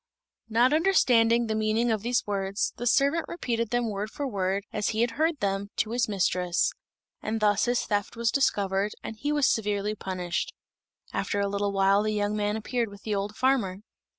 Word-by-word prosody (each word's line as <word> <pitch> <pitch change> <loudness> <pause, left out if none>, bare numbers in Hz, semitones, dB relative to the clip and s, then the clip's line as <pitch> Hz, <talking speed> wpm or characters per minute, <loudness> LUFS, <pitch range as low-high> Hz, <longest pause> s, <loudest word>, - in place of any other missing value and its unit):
Not 240 +5 +3
understanding 240 -9 +4
the 220 - -2
meaning 220 +2 +1
of 215 -2 0
these 240 +2 0
words, 200 0 -1
the 240 - -3
servant 280 +7 +3
repeated 235 -9 -2
them 240 0 0
word 205 +1 -3
for 285 - -4
word, 195 -3 -1
as 210 -1 -1
he 220 0 0
had 240 0 +2
heard 315 +3 0
them, 195 0 -1
to 215 - -1
his 240 -1 0
mistress; 180 -3 +1 0.5
and 220 +1 -2
thus 205 -1 +3
his 245 0 0
theft 205 0 -1
was 230 -1 +1
discovered, 200 -6 +1
and 225 - -6
he 290 +7 -2
was 295 -3 +3
severely 210 -1 0
punished. 185 -4 -3 0.6
After 205 - -1
a 200 - +1
little 200 0 -1
while 195 +1 +3
the 215 0 -1
young 205 0 0
man 210 0 0
appeared 235 +1 -2
with 200 0 -13
the 215 - -2
old 200 +1 -2
farmer. 240 -8 +1
215 Hz, 190 wpm, -27 LUFS, 200-240 Hz, 0.6 s, understanding